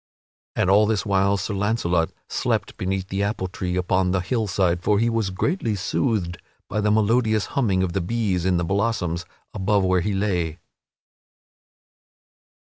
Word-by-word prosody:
And - - +1
all 105 +2 +5
this 105 -3 0
while 100 0 +2
Sir 95 +3 -3
Launcelot 95 -5 +1 0.2
slept - - -1
beneath 95 0 -3
the 95 +1 -2
apple 100 -2 -1
tree 90 -1 -4
upon 90 0 +1
the 95 0 +1
hillside, 95 -4 0
for 105 +3 +2
he 115 +2 +2
was 115 -4 0
greatly 110 - -1
soothed 95 -3 -1 0.3
by 105 +2 -1
the 105 - +1
melodious 110 0 +2
humming 100 -9 +2
of 90 -2 -2
the 95 - 0
bees 95 -2 -1
in 90 -1 +2
the 85 - 0
blossoms 95 -3 -1 0.3
above 100 +1 +1
where 95 -1 +2
he 100 +2 -1
lay. 90 -5 -1
95 Hz, 155 wpm, -23 LUFS, 90-105 Hz, 0.3 s, all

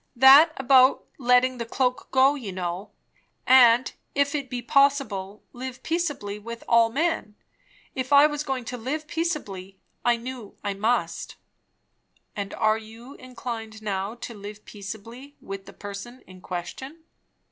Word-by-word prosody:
That 275 +6 +8
about 260 0 +5
letting 250 0 +3
the 235 - -3
cloak 250 +1 -1
go, 265 +2 +4
you 245 -9 -6
know; 180 +1 -4 0.6
and, 250 -1 +6 0.2
'If 280 +1 +2
it 280 -3 -3
be 245 -1 -4
possible,... 230 -8 +1
live 255 0 -7
peaceably 290 -12 -2
with 235 +2 -8
all 230 -1 +5
men.' 295 -5 -1 0.6
If 260 0 -4
I 285 +1 +8
was 295 -1 -1
going 265 -4 -3
to 250 - -5
live 280 +7 -4
peaceably, 300 - -4 0.3
I 240 -1 +3
knew 240 -3 -8
I 205 -1 -1
must." 220 +5 -1 1.0
"And 200 -1 -4 0.3
you 230 +4 -12
are - - -16
inclined 230 -4 -7
now 200 +1 -3
to 235 0 -8
live 210 0 -10
peaceably 225 +7 -9
with 195 0 -8
the - - -9
person 205 +5 -9
in 185 -1 -14
question?" 265 - -7
245 Hz, 145 wpm, -25 LUFS, 210-270 Hz, 1.0 s, That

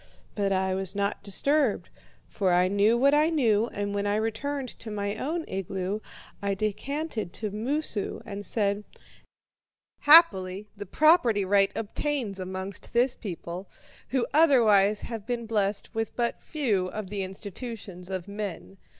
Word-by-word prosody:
"But 200 -2 0
I 190 0 +1
was 190 0 -1
not 200 0 -1
disturbed, 275 +4 0 0.4
for 190 -3 0
I 180 +1 +4
knew 205 +4 +3
what 275 +3 +4
I 305 +2 +4
knew, 230 -8 +2
and 205 -3 -4
when 205 0 -1
I 205 - +1
returned 250 +5 -2
to 225 - -8
my 205 -1 -2
own 320 +7 -3
igloo, 195 +1 -3 0.4
I 200 -1 0
descanted 215 - -3
to 215 -2 -4
Moosu, 230 0 -2
and 205 -1 -6
said: 205 0 0 1.2
'Happily 210 - +6
the 205 -1 -8
property 245 - +4
right 195 0 +3
obtains 225 -2 -3
amongst 190 +1 -6
this 245 +2 +3
people, 180 -2 -7 0.4
who 260 -2 0
otherwise 220 -10 +5
have 225 -3 -6
been 240 -1 -2
blessed 210 -2 -1
with 225 -1 -3
but 240 -1 -1
few 220 -12 0
of 200 +1 -6
the 205 -1 -2
institutions 195 -1 -7
of 185 -2 -4
men. 200 -1 -6
210 Hz, 145 wpm, -27 LUFS, 195-240 Hz, 1.2 s, Happily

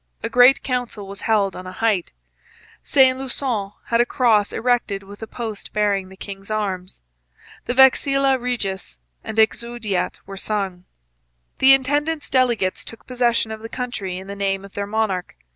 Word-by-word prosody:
A - - -3
great 250 +2 +6
council 245 -6 -3
was 200 +1 -9
held 205 -3 +2
on 185 - -8
a - - -6
height. 205 -4 0 0.7
Saint 260 -1 +4
Lusson 245 -6 -3
had 235 0 +2
a - - +3
cross 220 -6 +2
erected 235 -5 0
with 200 +2 -13
a 225 - -6
post 220 -3 -6
bearing 200 -3 0
the 190 - -14
king's 195 0 -9
arms. 195 -4 -3 0.6
The 245 - -2
Vexilla 270 0 +4
Regis 200 - -3 0.3
and 220 - -6
the 220 - +8
Exaudiat 235 -4 -4
were 195 0 -8
sung. 190 -3 -3 0.7
The 265 +1 +8
intendant's 290 +4 -1
delegates 240 -8 +1
took 230 - -10
possession 240 -3 +1
of 220 - -5
the 225 +1 -8
country 235 -8 -4
in 190 - -8
the 200 +1 -7
name 195 -1 -1
of 200 - -14
their 200 0 -3
monarch. 205 -4 -1
220 Hz, 165 wpm, -21 LUFS, 195-250 Hz, 0.7 s, the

